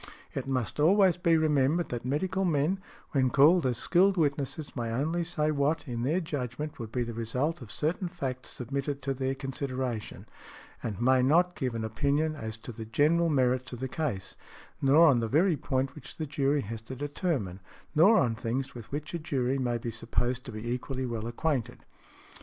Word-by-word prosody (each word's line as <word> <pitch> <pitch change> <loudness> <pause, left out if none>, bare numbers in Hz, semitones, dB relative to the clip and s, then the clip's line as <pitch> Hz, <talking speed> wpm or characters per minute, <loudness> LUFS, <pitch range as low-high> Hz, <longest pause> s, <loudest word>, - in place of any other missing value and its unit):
It - - -4
must 130 -1 -1
always 185 +3 +5
be 170 -2 +3
remembered 155 +1 +2
that 120 -1 -4
medical 180 +9 0
men, 170 +2 +1 0.3
when 130 -3 +3
called 150 +4 +5
as 125 -2 0
skilled 185 +7 +3
witnesses, 145 -1 -1
may 120 -3 -2
only 155 +8 0
say 155 -3 0
what, 150 +1 0
in 120 -2 -3
their 150 +9 +1
judgment, 145 -3 -4
would 110 -2 -6
be 125 0 0
the 115 0 -5
result 125 +9 -2
of 110 -5 -9
certain 170 - -1
facts 135 -8 -5
submitted 140 +3 -4
to 135 +1 0
their 135 0 -1
consideration, 130 -4 -4 0.6
and 105 -3 -4
may 130 +2 +4
not 170 +7 +4
give 125 -3 -2
an 115 - -2
opinion 140 +7 +1
as 110 -5 -5
to 115 +2 -9
|119| - - -18
the 110 - -5
general 155 +9 +3
merits 130 -3 +1
of 120 - -6
the 130 - -2
case, 130 -9 -3 0.5
nor 145 +5 +6
on 135 -5 +5
the 115 - -1
very 165 - +3
point 130 -1 -1
which 135 -3 -11
the 160 - -2
jury 140 0 +1
has 110 0 -6
to 120 +4 -8
determine, 140 - -2 0.3
nor 180 +8 +6
on 120 - +3
things 125 +3 -3
with 120 -3 -10
which 150 +4 -4
a 170 - -2
jury 135 -4 -1
may 120 -2 0
be 115 0 -4
supposed 125 +2 -1
to 125 - -6
be 110 +1 -6
equally 130 +2 -2
well 115 -2 -3
acquainted. 130 0 -2
135 Hz, 195 wpm, -29 LUFS, 125-155 Hz, 0.6 s, nor